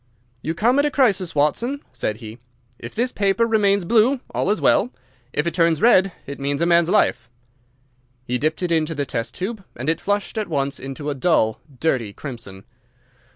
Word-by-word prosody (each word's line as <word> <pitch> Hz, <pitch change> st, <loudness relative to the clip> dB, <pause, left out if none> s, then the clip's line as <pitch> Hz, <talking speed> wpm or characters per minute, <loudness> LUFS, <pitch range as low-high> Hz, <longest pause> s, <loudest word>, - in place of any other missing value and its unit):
"You 160 Hz, -, -3 dB
come 240 Hz, +10 st, +3 dB
at 285 Hz, -, +3 dB
a -, -, +1 dB
crisis, 200 Hz, -, +1 dB
Watson," 235 Hz, -, 0 dB
said 105 Hz, -, -3 dB
he. 110 Hz, 0 st, -10 dB, 0.4 s
"If 115 Hz, -, -9 dB
this 245 Hz, +2 st, 0 dB
paper 200 Hz, +3 st, +2 dB
remains 200 Hz, -4 st, +2 dB
blue, 235 Hz, +7 st, +3 dB
all -, -, -1 dB
is 210 Hz, -, +1 dB
well. 235 Hz, -, +3 dB, 0.4 s
If 150 Hz, -, -1 dB
it 170 Hz, -, -1 dB
turns 165 Hz, -2 st, +2 dB
red, 195 Hz, -4 st, +5 dB
it 140 Hz, 0 st, -7 dB
means 140 Hz, +1 st, -1 dB
a 170 Hz, -, +2 dB
man's 170 Hz, -1 st, +4 dB
life." 125 Hz, -, +2 dB, 1.0 s
He 125 Hz, +1 st, -1 dB
dipped 155 Hz, +5 st, -1 dB
it 175 Hz, -, -1 dB
into 160 Hz, -1 st, +1 dB
the 145 Hz, -1 st, -1 dB
test 115 Hz, -4 st, -3 dB
tube 200 Hz, +2 st, -4 dB
and 130 Hz, -, -6 dB
it 165 Hz, -, 0 dB
flushed 205 Hz, +2 st, -1 dB
at 215 Hz, -, -2 dB
once 140 Hz, -3 st, -1 dB
into 135 Hz, +2 st, -5 dB
a -, -, -1 dB
dull, 130 Hz, -6 st, +1 dB, 0.2 s
dirty 125 Hz, -10 st, 0 dB
crimson. 110 Hz, -8 st, -9 dB
165 Hz, 190 wpm, -22 LUFS, 140-205 Hz, 1.0 s, red